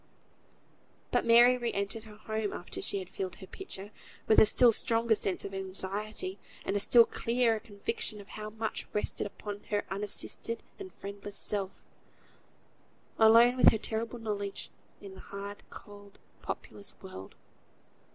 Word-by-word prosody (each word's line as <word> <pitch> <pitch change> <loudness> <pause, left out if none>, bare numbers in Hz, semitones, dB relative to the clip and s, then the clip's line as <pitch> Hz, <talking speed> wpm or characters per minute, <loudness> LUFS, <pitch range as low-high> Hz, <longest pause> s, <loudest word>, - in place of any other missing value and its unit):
But - - +1
Mary 240 +2 +7
re 235 -1 -1
entered 200 +3 -2
her 215 -1 -12
home 215 0 -3
after 175 - -5
she - - -1
had 190 -2 -5
filled 185 -1 -5
her - - -11
pitcher, 205 - -8 0.3
with 220 - +6
a 215 - +8
still 240 +2 +7
stronger 230 +1 +2
sense 195 -3 0
of 195 - -6
anxiety, 200 - -4 0.3
and 195 - -1
a - - +3
still 230 +3 +7
clearer 230 -1 +1
conviction 210 0 -3
of 200 - -12
how 215 0 -6
much 220 0 -4
rested 210 - 0
upon 205 0 -8
her 205 -1 -1
unassisted 210 +3 -3 0.2
and 380 -1 -8
friendless 200 0 -8
self, 200 -2 0 1.5
alone 230 +2 +7
with - - +8
her - - 0
terrible 225 +2 -3
knowledge, 205 -3 -4 0.3
in 200 -2 -9
the 190 - -12
hard, 200 +1 -7
cold, 205 -1 -13 0.2
populous 200 - -5
world. 95 - -9
210 Hz, 150 wpm, -31 LUFS, 200-230 Hz, 1.5 s, a